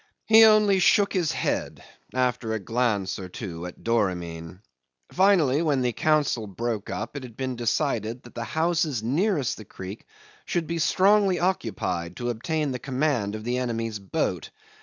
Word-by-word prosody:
He 225 0 +8
only 210 -3 +5
shook 200 +2 +4
his 175 -5 +1
head, - - -2 0.3
after 125 -3 0
a 110 - -1
glance 105 -3 -1
or 95 -1 -7
two 90 -3 -6
at 90 - -12
Doramin. 90 -6 -2 0.5
Finally, 175 -7 +3
when 145 -5 +1
the 125 -1 0
council 145 -6 +1
broke 110 +1 -3
up 110 +6 -5
it 140 - -4
had 120 -4 -11
been 130 -1 -3
decided 115 -1 -1
that 120 - -14
the 115 - -4
houses 155 -4 0
nearest 150 - 0
the 110 - -9
creek 95 +2 -9 0.4
should 175 -2 -1
be 170 +1 -3
strongly 195 +2 +3
occupied 95 - -2
to 120 0 -2
obtain 150 +5 -2
the 125 - -4
command 130 -6 -1
of 110 - -7
the 120 +2 -1
enemy's 115 -3 -2
boat. 100 -1 -2
125 Hz, 160 wpm, -25 LUFS, 110-160 Hz, 0.5 s, He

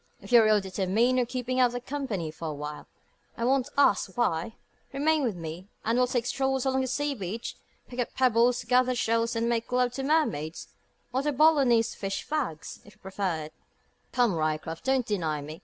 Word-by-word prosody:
If - - -12
you're 235 -2 +8
really 215 -1 +4
determined 195 +7 +1
on 245 - +2
keeping 255 +1 -2
out 245 -1 +3
of 245 0 -5
company 250 - -3
for 160 +1 -7
awhile 150 0 -6 0.5
I 230 - -1
won't 265 +1 +2
ask 200 -8 +3
why 220 -2 0 0.4
remain 300 +3 +2
with 235 -8 -1
me, 165 +2 -7 0.2
and 230 - +1
we'll 250 0 +3
take 245 -2 -1
strolls 265 0 0
along 265 0 +1
the 260 - -1
sea 290 +3 -1
beach, 220 0 -5 0.3
pick 250 - -9
up 245 - -2
pebbles, 245 -1 +3
gather 255 0 +3
shells, 230 0 0
and 230 +1 0
make 235 0 -1
love 250 0 +2
to 270 - -4
mermaids, 225 - 0 0.4
or 260 - +1
the 295 +1 0
Boulognese 265 -6 +4
fish 195 -1 -4
fags, 270 - -3
if 205 0 -17
you - - -32
prefer 190 -5 -3
it. 155 - -10 0.6
Come, 245 -5 +2
Ryecroft, 155 0 -2
don't 265 -2 +1
deny 165 -8 -1
me. 155 +3 -8
235 Hz, 190 wpm, -28 LUFS, 190-255 Hz, 0.6 s, you're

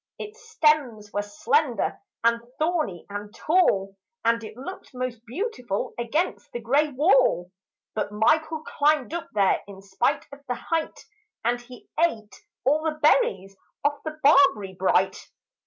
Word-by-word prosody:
Its 450 +2 -10
stems 295 - +1
were 205 - 0
slender 240 +4 0 0.2
and 230 0 +3 0.2
thorny 310 - -1
and 205 +1 -7
tall 200 - +2 0.3
And 230 0 +2
it 215 +1 -9
looked 265 +1 -9
most 250 -2 -4
beautiful 250 - -3
against 300 +10 -2
the 240 - -4
grey 280 +6 +2
wall. 255 - +3 0.4
But 210 - -2
Michael 315 +9 +2
climbed 300 -2 +1
up 340 - -4
there 200 -2 +3
In 195 -1 -11
spite 240 +9 0
of 280 - -10
the 250 - -1
height 325 +4 -3 0.4
And 240 +1 +1
he 245 0 -14 0.2
ate 220 -11 -1 0.3
all 295 +4 +3
the 310 -1 -2
berries 195 -10 +2 0.3
off 290 0 +1
the 310 -1 -5
barberry 275 -9 +5
bright. 185 0 +1
250 Hz, 140 wpm, -25 LUFS, 210-305 Hz, 0.4 s, barberry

